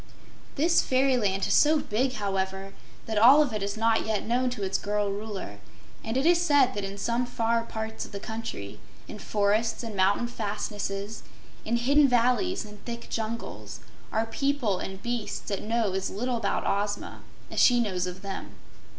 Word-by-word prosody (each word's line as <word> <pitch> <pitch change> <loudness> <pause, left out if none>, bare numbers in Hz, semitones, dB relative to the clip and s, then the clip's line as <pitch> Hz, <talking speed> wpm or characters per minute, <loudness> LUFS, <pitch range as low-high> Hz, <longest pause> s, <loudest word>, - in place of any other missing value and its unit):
This 330 +4 +4
fairyland 250 -8 +2
is - - +1
so 310 +1 +5
big, 255 +1 0
however, 195 -2 -2 0.3
that 220 -2 0
all 270 +7 +8
of 260 -6 -4
it 210 - -2
is 200 +2 -3
not 225 0 +2
yet 220 -2 -1
known 250 +2 +1
to 245 -5 -5
its 195 0 0
girl 205 0 -1
Ruler, 200 - -6 0.4
and 225 +3 -2
it 270 - +1
is 345 0 +5
said 285 -6 +4
that 205 - -3
in 195 +1 -5
some 235 +4 0
far 230 -1 +1
parts 220 -1 -5
of - - -10
the 200 - -5
country, 220 - -6 0.3
in - - -8
forests 215 +3 0
and 225 -3 -5
mountain 195 +5 +3
fastnesses, 205 -2 -4 0.4
in 230 - 0
hidden 280 +4 +4
valleys 250 - +2
and 210 -1 -13
thick 235 -1 -7
jungles, 225 +1 -4 0.3
are 220 0 +1
people 240 -4 0
and 190 0 -6
beasts 240 -2 -3
that 200 - -2
know 220 -3 0
as 190 0 -1
little 245 +4 -2
about 210 -3 -1
Ozma 205 +1 -2 0.3
as - - -2
she 245 -1 +6
knows 185 -6 0
of 180 +2 -7
them. 195 -1 -6
220 Hz, 175 wpm, -27 LUFS, 200-245 Hz, 0.4 s, all